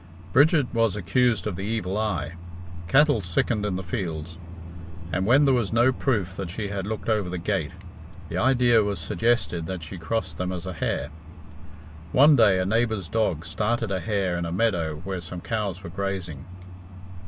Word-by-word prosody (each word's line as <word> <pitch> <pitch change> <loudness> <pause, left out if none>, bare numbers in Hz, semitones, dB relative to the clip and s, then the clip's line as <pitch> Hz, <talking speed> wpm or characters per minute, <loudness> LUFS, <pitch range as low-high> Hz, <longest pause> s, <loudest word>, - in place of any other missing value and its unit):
Bridget 150 0 +5
was 115 -4 +2
accused 110 +3 +1
of 105 -4 -2
the 95 - -6
evil 100 -2 -2
eye. 90 -8 -1 0.6
Cattle 145 - +4
sickened 105 +4 0
in 95 - -2
the 95 - -4
fields, 85 -3 -4 0.7
and 95 +2 0
when 135 +5 +5
there 135 - +4
was 120 -6 0
no 120 +3 +4
proof 105 -10 -1
that 95 -3 -4
she 100 +3 -4
had 100 -1 -4
looked 110 0 -4
over 105 -5 +1
the 90 - -3
gate, 85 - -1 0.6
the 85 - -6
idea 120 +2 +4
was 100 -1 -1
suggested 85 0 0
that 90 -2 -5
she 85 +4 -7
crossed 90 -2 -3
them 90 0 -1
as 90 -1 -5
a 95 - -4
hare. 75 -3 -2 1.0
One 145 +3 +7
day 105 -6 +5
a 95 - 0
neighbour's 110 -2 0
dog 90 -6 0
started 105 +6 -1
a 95 - 0
hare 100 -3 -1
in 85 - -2
a - - -4
meadow 85 -7 0
where 95 -1 -4
some 85 +2 -7
cows 100 -1 -3
were 85 - -7
grazing. 95 -6 -4
100 Hz, 180 wpm, -25 LUFS, 90-115 Hz, 1.0 s, One